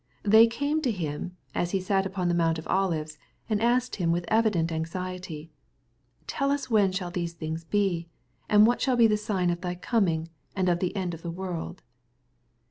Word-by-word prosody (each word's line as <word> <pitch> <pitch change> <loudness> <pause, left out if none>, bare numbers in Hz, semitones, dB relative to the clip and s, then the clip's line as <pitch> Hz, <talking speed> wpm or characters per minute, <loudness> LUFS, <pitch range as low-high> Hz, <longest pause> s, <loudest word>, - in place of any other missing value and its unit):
They 220 +2 +7
came 285 +7 -1
to 270 - 0
Him, 180 -2 -4 0.2
as 175 - -1
He - - -2
sat 195 +1 +1
upon 190 -2 -2
the 175 - +2
Mount 165 -1 +2
of 160 - -7
Olives, 160 -6 -1 0.3
and 215 -2 0
asked 245 +2 +1
Him 170 -4 +1
with 170 +1 0
evident 215 -7 +2
anxiety, 165 -1 -5 0.4
" 120 +1 -41
Tell 275 0 -1
us 280 -3 -1
when 205 -4 +4
shall 185 -2 -3
these 170 -1 -3
things 160 0 -5
be? 180 -3 0 0.4
and 210 0 +7
what 240 +2 +2
shall 260 -2 +2
be 235 - +6
the 215 -1 +4
sign 205 -5 0
of 175 0 -4
thy 180 -1 -3
coming, 175 -5 0 0.3
and 185 -2 +1
of 175 -1 +2
the 185 +2 -2
end 185 -3 -2
of 165 - -8
the 170 - -5
world 175 0 -5
185 Hz, 200 wpm, -27 LUFS, 165-210 Hz, 0.4 s, They